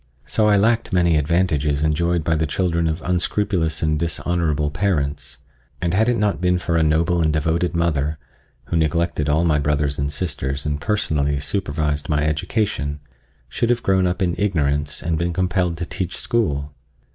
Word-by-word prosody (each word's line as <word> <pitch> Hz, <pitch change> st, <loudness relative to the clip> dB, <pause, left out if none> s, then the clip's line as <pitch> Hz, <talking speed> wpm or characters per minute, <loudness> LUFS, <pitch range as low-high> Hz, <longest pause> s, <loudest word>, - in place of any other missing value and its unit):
So 105 Hz, +7 st, +1 dB
I 105 Hz, -1 st, +5 dB
lacked 115 Hz, +3 st, +2 dB
many 85 Hz, -3 st, +3 dB
advantages 75 Hz, -2 st, +1 dB
enjoyed 85 Hz, +2 st, +1 dB
by 80 Hz, +1 st, +1 dB
the 80 Hz, 0 st, 0 dB
children 85 Hz, +1 st, 0 dB
of 80 Hz, +2 st, -3 dB
unscrupulous 90 Hz, -2 st, 0 dB
and 75 Hz, -1 st, +1 dB
dishonorable 80 Hz, -2 st, -1 dB
parents, 75 Hz, -8 st, -1 dB, 0.4 s
and 85 Hz, -1 st, -1 dB
had 110 Hz, +5 st, +3 dB
it 120 Hz, -, +1 dB
not 100 Hz, -7 st, 0 dB
been 90 Hz, 0 st, +2 dB
for 85 Hz, -1 st, -2 dB
a 80 Hz, -, +3 dB
noble 80 Hz, +3 st, +2 dB
and 80 Hz, -1 st, +2 dB
devoted 80 Hz, +3 st, 0 dB
mother, 75 Hz, -3 st, 0 dB, 0.5 s
who -, -, -4 dB
neglected 80 Hz, -1 st, 0 dB
all 80 Hz, +3 st, +2 dB
my 75 Hz, -3 st, +3 dB
brothers 75 Hz, -1 st, 0 dB
and 70 Hz, +1 st, -1 dB
sisters 70 Hz, -3 st, -3 dB
and 75 Hz, -1 st, -2 dB
personally 75 Hz, -9 st, 0 dB
supervised 75 Hz, -3 st, -2 dB
my 75 Hz, -1 st, +1 dB
education, 75 Hz, -1 st, -1 dB, 0.5 s
should 115 Hz, -, -1 dB
have 120 Hz, -1 st, +1 dB
grown 95 Hz, -1 st, +2 dB
up 90 Hz, +2 st, -1 dB
in 85 Hz, -2 st, +1 dB
ignorance 75 Hz, -7 st, 0 dB
and 80 Hz, -1 st, -1 dB
been 85 Hz, 0 st, -1 dB
compelled 90 Hz, -2 st, 0 dB
to 85 Hz, -, -3 dB
teach 90 Hz, +1 st, -4 dB
school. 75 Hz, -11 st, -1 dB
80 Hz, 170 wpm, -21 LUFS, 75-90 Hz, 0.5 s, I